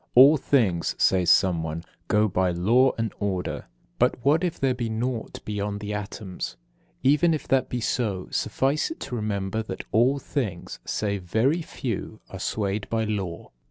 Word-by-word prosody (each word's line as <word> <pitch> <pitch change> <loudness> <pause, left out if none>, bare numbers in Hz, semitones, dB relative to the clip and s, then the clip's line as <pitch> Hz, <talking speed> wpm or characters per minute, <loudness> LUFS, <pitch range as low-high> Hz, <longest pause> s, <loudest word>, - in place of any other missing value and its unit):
"All 135 +5 +9
things," 115 - +1
says 90 -3 +3
someone, 80 -4 +2 0.2
"go 105 +1 +3
by 95 -1 +1
law 115 +10 +3
and 115 -2 -2
order." 95 -3 -2 0.3
But 125 +1 +3
what 155 +5 +4
if 175 -2 -1
there 135 -1 +2
be 120 -2 -3
naught 115 +1 -3
beyond 105 -1 -3
the 105 0 -4
atoms? 100 - -5 0.5
Even 150 +5 +4
if 155 - -7
that 135 -1 +2
be 125 - -2
so, 105 -5 -1
suffice 140 +3 0
it 325 - -7
to 125 - -4
remember 105 -1 -2
that 110 - -6
all 125 +5 +4
things, 115 - -4
save 100 -2 -1
very 115 - +1
few, 115 - -5
are 95 - -7
swayed 100 +1 -2
by 115 -1 0
law. 100 -6 -4
110 Hz, 160 wpm, -25 LUFS, 95-130 Hz, 0.5 s, All